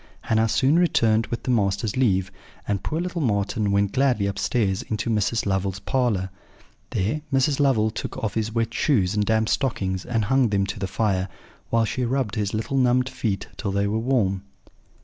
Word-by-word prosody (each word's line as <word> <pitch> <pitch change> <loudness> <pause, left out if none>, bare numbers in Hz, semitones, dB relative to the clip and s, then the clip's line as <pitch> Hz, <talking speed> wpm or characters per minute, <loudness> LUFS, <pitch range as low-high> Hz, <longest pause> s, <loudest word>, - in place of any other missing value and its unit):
"Hannah 110 0 +1
soon 135 +9 +3
returned 115 -10 +2
with 120 - -4
the 130 - 0
master's 100 -2 0
leave, 95 -7 +1 0.4
and 100 -2 -1
poor 160 - -2
little 180 -1 -3
Marten 105 -3 0
went 100 0 +2
gladly 130 -5 +2
upstairs 100 0 0
into 110 +2 -3
Mrs. 110 +1 0
Lovel's 95 -1 -1
parlour. 100 -3 0 0.6
There 110 +11 -1
Mrs. 135 +1 +2
Lovel 120 -6 +3
took - - -5
off 110 - -2
his 110 0 -1
wet 115 0 -1
shoes 105 -10 +2
and 105 -1 +1
damp 110 +1 +1
stockings, 95 -10 -1
and 115 -3 -1
hung 135 +1 +3
them 100 -1 +1
to 100 - -5
the 95 - -2
fire, 95 -2 0 0.4
while 115 -1 +2
she 125 +4 -2
rubbed 125 -3 -1
his 105 -3 -1
little 110 +5 -2
numbed 125 0 +3
feet 100 -6 -2
till 100 - -2
they 100 +1 +1
were 105 +2 0
warm. 110 -6 +1
110 Hz, 185 wpm, -24 LUFS, 100-125 Hz, 0.6 s, soon